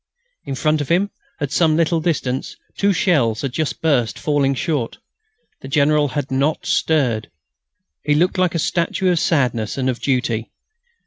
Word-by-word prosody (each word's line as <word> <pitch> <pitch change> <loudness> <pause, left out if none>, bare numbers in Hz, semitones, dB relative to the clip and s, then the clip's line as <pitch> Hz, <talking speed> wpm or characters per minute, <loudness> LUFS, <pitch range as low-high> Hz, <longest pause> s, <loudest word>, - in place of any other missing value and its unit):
In 135 - -4
front 155 +2 +1
of 145 - -5
him, 190 +4 +2 0.3
at 145 -2 -3
some 160 -2 +3
little 165 0 +2
distance, 135 -6 -2 0.2
two 200 0 +2
shells 145 - +1
had 135 - -2
just 155 +4 -3
burst, 135 -8 +1
falling 140 -2 +1
short. 140 -5 -2 0.6
The - - -8
General 145 +1 +3
had 145 0 -4
not 140 +4 0
stirred. 125 - +1 0.7
He 150 - +2
looked 180 +4 +1
like 180 -2 +1
a - - +2
statue 180 +3 0
of 175 - +1
sadness 125 -10 0
and 130 -1 +1
of 125 - -8
duty. 120 -4 -1
145 Hz, 165 wpm, -20 LUFS, 130-165 Hz, 0.7 s, some